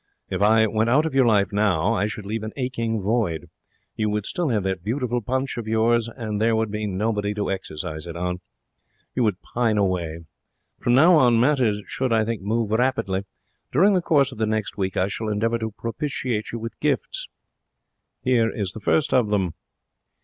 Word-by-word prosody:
If 95 +1 -2
I 110 +2 +5
went 110 +1 +1
out 145 +6 +4
of 160 - -2
your 135 -2 +4
life 100 -3 +3
now 100 -1 +2
I 105 -1 +1
should 105 -1 -6
leave 110 +2 -3
an 110 0 -6
aching 115 -4 -1
void. 100 -6 -1 0.4
You 110 -1 0
would 105 -1 -1
still 175 -5 -1
have 105 -5 +1
that 95 -2 -2
beautiful 120 +2 -1
punch 130 +4 -2
of 115 -2 -5
yours, 115 +1 +2
and 110 -3 -4
there 115 0 +3
would 110 -1 0
be 105 0 -2
nobody 105 +1 -1
to 105 -1 -1
exercise 80 -3 -5
it 85 - -7
on. 90 +1 -3 0.7
You 125 - -1
would 105 -6 0
pine 115 -3 0
away. 85 -5 -1 0.5
From 120 - +2
now 165 +6 +7
on 120 -5 +5
matters 120 -6 +2
should, 130 -2 -2
I 110 -1 +3
think, 115 -2 -3
move 110 +2 -1
rapidly. 110 -5 0 0.5
During 190 +10 +4
the 185 - +2
course 140 -5 +3
of 120 - -11
the 110 - +1
next 110 -1 -2
week 95 -3 -2
I 95 - +2
shall 110 +2 -3
endeavour 115 +3 0
to 110 -1 -2
propitiate 115 0 -3
you 115 - -4
with 115 0 -7
gifts. - - -1 1.0
Here 120 -3 +3
is 100 -6 -2
the 110 - -5
first 145 +8 +1
of 120 -5 +3
them.' 95 -5 0
110 Hz, 195 wpm, -23 LUFS, 100-120 Hz, 1.0 s, now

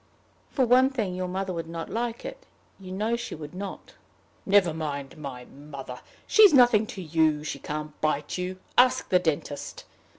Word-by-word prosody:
"For 265 - +1
one 255 +2 +5
thing, 220 -9 -2
your 185 0 -3
mother 190 +1 -3
would 165 -1 -4
not 165 0 -5
like 235 - -3
it. - - -8 0.3
You 185 -1 -9
know 215 +5 0
she 235 - -5
would 150 0 -9
not." 195 +2 -7 0.5
"Never 195 -4 +4
mind 145 -4 -4
my 135 -5 -7
mother. 140 -3 -9 0.3
She's 420 -8 +7
nothing 240 -4 +6
to 190 - -7
you. 155 -2 +2
She 155 - -5
can't 150 0 -5
bite 150 -1 0
you. 180 +1 -4 0.2
Ask 255 +1 +4
the 180 - +5
dentist. 150 -4 -3
180 Hz, 170 wpm, -26 LUFS, 150-230 Hz, 0.5 s, She's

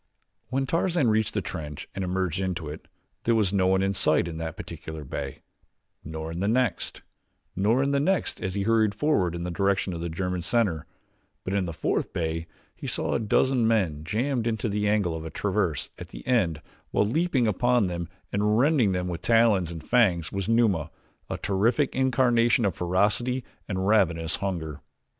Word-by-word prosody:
When 135 +1 -1
Tarzan 165 -2 +1
reached 110 0 +1
the 105 - 0
trench 75 -3 -6
and 95 - -3
emerged 95 -1 -1
into 90 -4 -2
it 75 - -9 0.4
there 115 - +3
was 105 -3 +2
no 95 -2 +3
one 95 0 +3
in 95 0 +1
sight 90 - +3
in 80 -1 -5
that 80 -1 -5
particular 80 -1 -7
bay, 65 - -6 0.6
nor 80 +1 -5
in 85 - -5
the 100 - 0
next, 115 -4 0 0.5
nor 115 +8 +2
the 140 0 +1
next 185 +5 0
as 95 0 -3
he 100 - 0
hurried 110 -1 +2
forward 100 - +1
in 85 - -4
the 90 - -3
direction 95 +1 0
of 85 - -5
the 85 - -3
German 90 +2 -2
center; 95 -7 0 0.6
but 95 - -3
in 100 -2 +1
the 85 - -4
fourth 80 - -1
bay 80 0 -2 0.3
he - - -7
saw - - 0
a - - +1
dozen 115 +2 +2
men 90 -10 +1
jammed 120 - -1
in 115 - +1
the 105 -2 -1
angle 100 -6 +1
of 80 - -5
the 80 - -6
traverse 95 -4 -1
at - - -7
the - - -11
end 90 -12 +1 0.3
while - - +2
leaping 140 +1 +1
upon 120 +2 +2
them 85 -2 -4 0.2
and 105 +1 +2
rending 115 - +2
with 85 -2 -4
talons 115 -7 +3
and 80 -2 -8
fangs 90 -9 +3
was 100 +1 -3
Numa, 110 -9 +2 0.4
a - - -2
terrific 115 +8 +1
incarnation 120 -3 +3
of 100 - +1
ferocity 105 +9 +1 0.2
and 95 -2 -2
ravenous 85 -6 +2
hunger. 85 -7 -4
100 Hz, 185 wpm, -26 LUFS, 85-115 Hz, 0.6 s, there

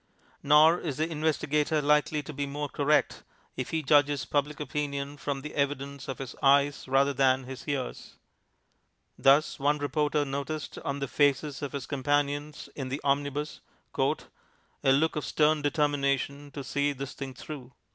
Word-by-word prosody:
Nor 155 +4 +6
is 145 -6 -4
the 155 +1 0
investigator 150 -1 0
likely 150 +1 +2
to 150 - -8
be 145 0 -3
more 145 +1 -3
correct 145 +2 +1 0.3
if 130 - -4
he 160 -1 -1
judges 145 -1 +3
Public 145 0 -1
Opinion 145 -1 -3
from 140 -1 -4
the 150 +2 -7
evidence 140 -1 -2
of 135 - -4
his 135 -2 -7
eyes 140 +1 +3
rather 135 +2 +3
than 130 -1 +3
his 130 0 -9
ears. 140 -3 -4 1.0
Thus 140 +4 +4
one 145 +2 +2
reporter 150 0 0
noticed 140 +2 -4
on 140 - -3
the 140 - -1
faces 145 +1 +1
of 145 -1 -4
his 140 -4 -4
companions 145 +1 -1
in 135 -3 -4
the 135 +3 -3
omnibus 145 +1 -1 0.3
"a - - +3 0.8
look 155 +4 +2
of 150 - -2
stern 155 0 +2
determination 145 -1 0
to 140 0 -7
see 145 +2 0
this 140 0 -6
thing 135 -2 -7
through." 135 -2 -9
145 Hz, 155 wpm, -28 LUFS, 140-150 Hz, 1.0 s, Nor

